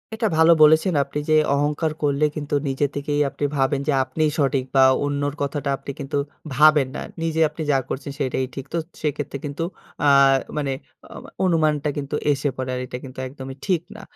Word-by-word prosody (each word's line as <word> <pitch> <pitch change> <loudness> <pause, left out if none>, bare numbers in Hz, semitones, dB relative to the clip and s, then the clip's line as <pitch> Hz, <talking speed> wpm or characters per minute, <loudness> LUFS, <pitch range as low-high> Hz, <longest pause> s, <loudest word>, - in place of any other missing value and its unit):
এটা 220 0 0
ভালো 160 +1 +6
বলেছেন 160 +4 +5
আপনি। 140 +2 -7
যে, - - +4 0.2
অহংকার 150 +2 0
করলে 145 +1 +2
কিন্তু 145 -1 -5
নিজে 135 +2 0
থেকেই 145 +1 -1
আপনি 145 - -3
ভাবেন 135 +1 +1
যে, - - +3
আপনিই 155 +2 0
সঠিক 135 -2 +2
বা 135 - +7 0.2
অন্যর 145 0 -1
কথাটা 140 0 -2
আপনি 140 0 -7
কিন্তু 140 +1 -3 0.4
ভাবেন 150 -2 +5
না। - - -4 0.2
নিজে 160 -1 -1
আপনি 155 - -8
যা 135 - +4
করছেন 140 +1 -4
সেটাই 130 -1 0
ঠিক। 135 - -6
তো - - 0 0.2
সেক্ষেত্রে 145 -2 -2
কিন্তু 145 +3 -3 0.4
অ্যা 145 - +4 0.5
মানে 140 -2 -1 0.4
অ - - -13 0.3
অনুমানটা 155 -4 +2
কিন্তু 145 +1 -3 0.2
এসে 145 0 0
পড়ে। 130 0 -3
আর - - -3
এটা 125 - -6
কিন্তু 130 -1 -9
একদমই 130 0 -8
ঠিক 180 -4 +1
না। 220 - -9
145 Hz, 185 wpm, -22 LUFS, 135-155 Hz, 0.5 s, বা